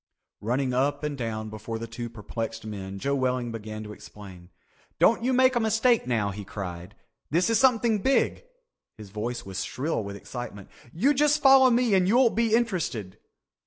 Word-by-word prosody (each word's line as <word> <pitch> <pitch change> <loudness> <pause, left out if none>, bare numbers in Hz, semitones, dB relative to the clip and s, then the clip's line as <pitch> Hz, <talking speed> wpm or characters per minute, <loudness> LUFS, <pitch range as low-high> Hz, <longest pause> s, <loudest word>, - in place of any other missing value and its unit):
Running 125 +4 -1
up 145 +3 0
and 150 -1 -2
down 110 -4 -4
before 110 +1 -6
the 115 - -5
two 120 +1 -6
perplexed 115 0 -6
men, 100 -2 -6
Joe 140 +8 -1
Welling 125 -3 -1
began 110 -1 -7
to 105 0 -8
explain. 95 -5 -13 0.5
"Don't 230 +1 +3
you 255 - +1
make 260 0 +4
a - - +3
mistake 225 - +2
now," 110 -5 0
he 100 +1 -7
cried. 90 0 -7 0.3
"This 175 +8 +2
is 225 - +3
something 235 -4 +3
big." 265 - +1 0.5
His 105 -3 -11
voice 115 +4 -4
was 95 -1 -4
shrill 140 -3 -3
with 100 0 -7
excitement. 105 -2 -8 0.2
"You 245 - +2
just 295 +2 +2
follow 265 -1 +7
me, 240 -3 +3
you'll 225 +7 +4
be 225 -1 +2
interested. 175 - -2
125 Hz, 170 wpm, -26 LUFS, -, 0.5 s, follow